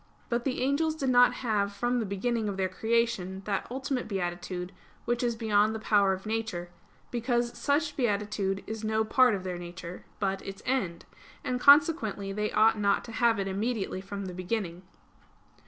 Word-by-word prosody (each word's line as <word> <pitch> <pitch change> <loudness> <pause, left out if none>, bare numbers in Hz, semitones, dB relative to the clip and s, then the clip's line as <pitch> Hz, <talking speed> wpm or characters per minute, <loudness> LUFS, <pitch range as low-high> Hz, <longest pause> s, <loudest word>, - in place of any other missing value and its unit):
But 235 0 -1
the 260 -2 -1
angels 310 +4 +1
did 270 -4 0
not 245 0 +6
have 205 -3 +1
from 245 +3 0
the 220 - -2
beginning 215 +3 -1
of 195 - -4
their 190 -1 +1
creation 200 -2 -1
that 200 -2 -2
ultimate 260 0 -3
beatitude 180 -1 -3 0.3
which 240 0 0
is 240 -2 0
beyond 215 -1 +2
the - - -4
power 205 -3 +3
of 190 +1 -4
nature; 215 -6 -3 0.4
because 240 0 0
such 295 +1 0
beatitude 205 -4 -1
is 220 0 -6
no 220 0 +1
part 250 0 +4
of 190 - -5
their 180 -2 -4
nature, 175 0 -8 0.2
but 195 -1 -1
its 195 0 -8
end; 195 -11 -1 0.4
and 250 0 -1
consequently 280 - +5
they 210 +1 -1
ought 220 0 +4
not 200 -1 +2
to 230 - -9
have 230 -1 +3
it 195 -1 -2
immediately 200 -1 -2
from 200 0 -6
the 185 - -6
beginning. 185 -1 -3
215 Hz, 175 wpm, -29 LUFS, 195-240 Hz, 0.4 s, not